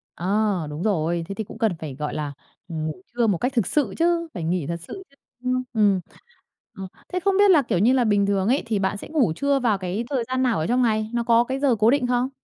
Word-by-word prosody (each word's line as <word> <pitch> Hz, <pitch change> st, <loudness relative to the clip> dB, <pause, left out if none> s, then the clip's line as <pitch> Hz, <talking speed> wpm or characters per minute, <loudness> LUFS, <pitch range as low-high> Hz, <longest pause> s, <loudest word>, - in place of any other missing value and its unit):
À, 175 Hz, -, -5 dB, 0.4 s
đúng 150 Hz, +3 st, -5 dB
rồi, 170 Hz, -4 st, 0 dB
thế 195 Hz, -, -5 dB
thì 220 Hz, -, -3 dB
cũng 215 Hz, -, -11 dB
cần 225 Hz, -3 st, +1 dB
phải, 150 Hz, -4 st, -6 dB
gọi 150 Hz, +2 st, -4 dB
là, 150 Hz, -2 st, -4 dB, 0.3 s
ngủ 160 Hz, 0 st, -4 dB
trưa 240 Hz, -1 st, +1 dB
một 200 Hz, -4 st, +2 dB
cách 250 Hz, +8 st, -1 dB
thực 230 Hz, -8 st, +1 dB
sự 270 Hz, -10 st, 0 dB
chứ, 335 Hz, 0 st, +1 dB
phải 170 Hz, -, -5 dB
nghỉ 165 Hz, -2 st, -1 dB
thật 170 Hz, +1 st, -3 dB
sự 385 Hz, -, -8 dB
chứ, 275 Hz, -, -27 dB, 0.3 s
ưm, 255 Hz, 0 st, 0 dB
ừm. 205 Hz, -4 st, +3 dB, 0.7 s
Ừm, 195 Hz, -3 st, -7 dB, 0.3 s
thế 365 Hz, -, +1 dB
không 390 Hz, +1 st, +1 dB
biết 405 Hz, -1 st, +6 dB
là, 320 Hz, -5 st, +6 dB
kiểu 225 Hz, -9 st, -1 dB
như 230 Hz, +7 st, +4 dB
là, 260 Hz, -2 st, +3 dB
bình 205 Hz, -3 st, +2 dB
thường 195 Hz, -1 st, 0 dB
ấy 260 Hz, +5 st, +2 dB
thì 220 Hz, -3 st, -1 dB
bạn 190 Hz, +1 st, -1 dB
sẽ -, -, -9 dB
ngủ 275 Hz, -, +2 dB
trưa 280 Hz, -, +1 dB
vào 230 Hz, -5 st, +1 dB
cái 190 Hz, +4 st, -3 dB
thời 265 Hz, -4 st, 0 dB
gian 260 Hz, 0 st, 0 dB
nào 245 Hz, -7 st, +1 dB
ở 155 Hz, -, -1 dB
trong 245 Hz, +4 st, +2 dB
ngày? 220 Hz, -2 st, +1 dB
Nó 235 Hz, 0 st, 0 dB
có 235 Hz, 0 st, +4 dB
cái 265 Hz, +2 st, -3 dB
giờ 275 Hz, -4 st, +3 dB
cố 220 Hz, +2 st, +5 dB
định 265 Hz, -2 st, +1 dB
không? 250 Hz, +1 st, +1 dB
225 Hz, 265 wpm, -23 LUFS, 185-255 Hz, 0.7 s, biết